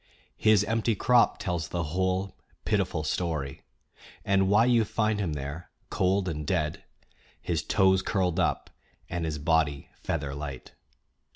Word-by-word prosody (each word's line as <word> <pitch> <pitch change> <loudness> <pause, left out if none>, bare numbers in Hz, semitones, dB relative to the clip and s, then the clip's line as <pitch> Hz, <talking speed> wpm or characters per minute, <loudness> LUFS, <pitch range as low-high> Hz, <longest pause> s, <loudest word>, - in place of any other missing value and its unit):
His 110 -2 +5
empty 110 +1 0
crop 120 +4 +3
tells 85 -3 -2
the 85 -1 -2
whole 95 +1 0 0.3
pitiful 80 - 0
story, 75 -4 -2 0.6
and 95 -1 +3
why 105 +3 +5
you 120 -2 +4
find 110 0 0
him 90 -6 -1
there 70 +4 -6 0.2
cold 95 +1 +1
and 75 -3 -3
dead, 75 +1 -1 0.6
his - - -1
toes 95 -1 +3
curled 90 -4 0
up - - 0 0.4
and 85 -1 -2
his 80 -2 -2
body 75 -2 0
feather 70 -1 -3
light. 70 -2 -7
90 Hz, 135 wpm, -28 LUFS, 75-100 Hz, 0.6 s, His